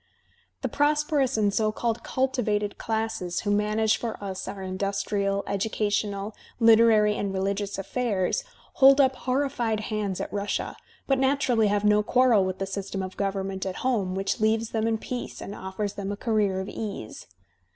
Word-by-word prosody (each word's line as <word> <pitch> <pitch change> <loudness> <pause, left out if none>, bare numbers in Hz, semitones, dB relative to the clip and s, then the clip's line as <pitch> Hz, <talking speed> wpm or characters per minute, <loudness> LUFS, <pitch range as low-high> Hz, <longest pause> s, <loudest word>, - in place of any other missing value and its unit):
The - - +1
prosperous 290 -3 +1
and 205 -2 +2
so 215 +1 +2
called 230 +1 -2
cultivated 215 -6 -1
classes 220 -5 -2
who 205 - -1
manage 215 +1 +2
for 230 -2 -4
us 195 -2 -5
our 195 - -6
industrial, 195 +1 -1
educational, 205 0 -1 0.3
liter 230 0 +7
ary 210 -1 +4
and 200 -2 -2
religious 195 +1 -2
affairs, 215 - -1 0.4
hold 270 +1 +8
up 265 -1 +4
horrified 255 -4 -1
hands 205 -3 -2
at - - -5
Russia, 205 0 -2 0.3
but 270 -1 +2
naturally 265 -5 +2
have 205 0 +1
no 210 0 +5
quarrel 245 -2 +4
with 185 0 -2
the 195 - -2
system 195 0 -4
of 185 0 -6
government 195 -1 -2
at 190 -1 -3
home 200 -8 +1
which 195 +4 -1
leaves 220 +1 +1
them 220 0 0
in 225 -1 +1
peace 245 +2 -6
and 200 - -7
offers 195 +1 -4
them 200 0 -4
a 205 - -4
career 210 -4 +1
of 190 - -4
ease. 205 - -6
210 Hz, 165 wpm, -26 LUFS, 195-230 Hz, 0.4 s, hold